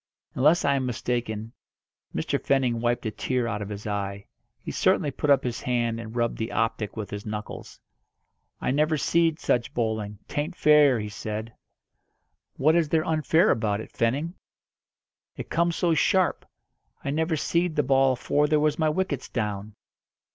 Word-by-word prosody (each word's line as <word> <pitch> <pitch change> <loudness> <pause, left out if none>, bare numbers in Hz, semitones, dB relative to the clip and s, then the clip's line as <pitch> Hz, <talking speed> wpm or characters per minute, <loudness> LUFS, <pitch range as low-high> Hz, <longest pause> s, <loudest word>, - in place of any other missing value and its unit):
Unless 150 +6 +3
I 140 - +4
am 135 -2 0
mistaken, 115 -2 -3 0.6
Mr. - - -1
Fenning 130 -4 +1
wiped 120 0 0
a 110 - -1
tear 125 +3 -1
out 105 -2 -3
of 105 - -5
his 105 0 -7
eye. 100 -1 -3 0.3
He - - -6
certainly 145 - +2
put 145 - -3
up 140 -2 +5
his 120 -2 -3
hand 120 -2 0
and 115 0 -8
rubbed 120 -1 0
the 110 +1 -3
optic 115 -2 -1
with 105 -2 -5
his 105 0 -5
knuckles. 105 0 -7 0.8
"I - - -1
never 155 +3 +2
seed 165 +1 +2
such 120 -2 0
bowling! 110 -3 -2
'Tain't 155 +5 -3
fair!" 150 -6 +5
he 105 0 -4
said. 110 +1 -5 1.0
"What 155 +4 +4
is 165 -3 +2
there 160 0 +2
unfair 160 +3 +3
about 105 -2 0
it, 110 - -8
Fenning?" 140 +9 0 1.0
"It - - -7
comes 170 +1 +1
so 170 -2 +2
sharp. 180 +4 +2 0.6
I 140 - -2
never 160 +2 0
seed 170 +2 0
the 150 - +2
ball 135 0 +4
afore 145 +4 +1
there 155 0 +3
was 150 0 +1
my 155 -1 +3
wickets 155 -4 -2
down." 105 0 -3
125 Hz, 170 wpm, -26 LUFS, 110-150 Hz, 1.0 s, up